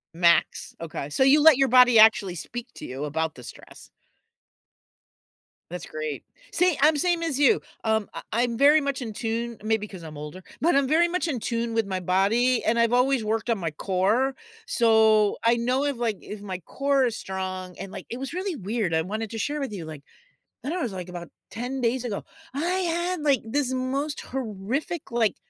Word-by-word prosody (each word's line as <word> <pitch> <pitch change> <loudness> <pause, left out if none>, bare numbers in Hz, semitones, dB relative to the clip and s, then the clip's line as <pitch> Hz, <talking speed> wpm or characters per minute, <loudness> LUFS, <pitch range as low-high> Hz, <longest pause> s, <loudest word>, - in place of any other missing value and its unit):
Max, 170 0 +2
okay. 155 -3 -6
So 150 - +2
you 280 +3 +6
let 310 -3 +7
your 270 0 +3
body 250 -2 +6
actually 210 -4 +5
speak 240 +8 -7
to - - -8
you 130 +3 -6
about 160 +1 -2
the 125 - -12
stress. - - -13 1.8
That's 175 -1 -6
great. 155 -2 -5 0.3
See, 360 -4 +2
I'm 305 +2 +5
same 340 +3 +1
as 305 -5 -1
you. 280 -4 +5 0.2
Um, 220 -2 +1
I - - -6
I'm 235 +1 +1
very 290 +4 +6
much 280 -2 -2
in 225 -3 -5
tune- 230 +1 -3
maybe 215 -1 0
'cause 185 -4 -11
I'm 155 -2 -9
older- 150 +5 -8 0.2
but 335 0 +3
I'm 280 -1 +3
very 325 +4 +4
much 350 0 -1
in 275 -7 -2
tune 230 +1 -2
with 225 -2 0
my 190 -1 -2
body, 205 +8 +2
and 230 +2 +1
I've 235 0 +3
always 250 0 +3
worked 220 +2 -2
on 230 - +2
my 165 -4 -3
core, 200 - 0 0.3
so 220 -3 +4
I 230 +1 +4
know 250 +3 0
if, 285 -3 -1
like 230 -4 -1
if 210 -1 -8
my 190 -3 -5
core 275 - 0
is 230 - -3
strong 185 -1 -5
and, 195 - -7
like - - -8
it 240 - -5
was 270 +3 -5
really 370 0 -3
weird, 210 - -2
I 160 - +2
wanted 215 +5 -4
to 225 - -5
share 295 +7 -2
with 275 -4 -3
you, 180 -5 -6
like 155 -3 -9 0.6
I 275 - -3
don't 335 - -2
know, - - -2
it - - 0
was, 230 - -3
like, 185 -1 -6
about 175 -1 -8 0.2
10 255 +3 -4
days 245 +1 0
ago, 210 -4 -4 0.3
I 275 - -4
had, 355 -2 -1
like, 280 -5 +3
this 260 +3 -1
most 275 +3 -2
horrific, 260 - -4
like 230 -3 +1
230 Hz, 205 wpm, -25 LUFS, 195-270 Hz, 1.8 s, let